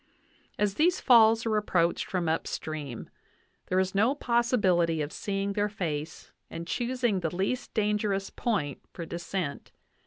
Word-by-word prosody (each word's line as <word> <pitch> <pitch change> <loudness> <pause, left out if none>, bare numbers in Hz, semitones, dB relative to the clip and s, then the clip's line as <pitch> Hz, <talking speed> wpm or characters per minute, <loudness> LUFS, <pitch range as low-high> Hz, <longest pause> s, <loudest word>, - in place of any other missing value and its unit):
As 210 -1 +1
these 345 - +2
falls 230 -2 +6
are 220 -1 +1
approached 175 -5 +1
from 180 -3 -1
upstream, 155 -5 -3 0.6
there 185 - 0
is 190 0 0
no 225 +8 +3
possibility 205 - +2
of 150 0 -2
seeing 200 0 -2
their 205 +1 0
face 160 -6 -4 0.2
and 165 - -6
choosing 240 -1 0
the 170 -1 -3
least 220 +8 -2
danger 210 -1 +1
ous 195 0 -2
point 150 - -2
for 170 - -6
descent. 170 -2 -4
195 Hz, 145 wpm, -28 LUFS, 170-225 Hz, 0.6 s, falls